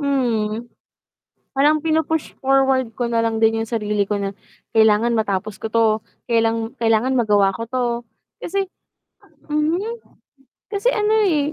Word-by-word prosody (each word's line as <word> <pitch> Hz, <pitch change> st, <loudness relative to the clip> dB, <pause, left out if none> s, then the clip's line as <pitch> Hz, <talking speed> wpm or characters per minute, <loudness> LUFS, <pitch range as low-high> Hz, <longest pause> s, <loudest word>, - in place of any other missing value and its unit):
Mhm, 240 Hz, -5 st, -1 dB, 0.9 s
parang 300 Hz, +3 st, +4 dB
pinu-push 320 Hz, 0 st, -1 dB
forward 265 Hz, -2 st, +2 dB
ko 240 Hz, +1 st, -2 dB
na 230 Hz, -1 st, +1 dB
lang 225 Hz, -1 st, -1 dB
din 225 Hz, 0 st, +3 dB
yung -, -, -14 dB
sarili 210 Hz, -3 st, 0 dB
ko 205 Hz, +1 st, -2 dB
na, 195 Hz, 0 st, -4 dB, 0.4 s
kailangan 220 Hz, +2 st, +4 dB
matapos 205 Hz, -1 st, -1 dB
ko 220 Hz, -, -5 dB
'to, 230 Hz, 0 st, +4 dB, 0.4 s
kailang 225 Hz, 0 st, +1 dB
kailangan 230 Hz, +3 st, +2 dB
magawa 205 Hz, -4 st, +3 dB
ko 230 Hz, -, -4 dB
'to, 250 Hz, +2 st, -2 dB, 0.6 s
kasi 390 Hz, +1 st, -1 dB, 0.8 s
mhm, 305 Hz, +4 st, +1 dB, 0.9 s
kasi 405 Hz, +4 st, +1 dB
ano 425 Hz, -2 st, +1 dB
eh 305 Hz, -6 st, +1 dB
235 Hz, 135 wpm, -21 LUFS, 220-285 Hz, 0.9 s, parang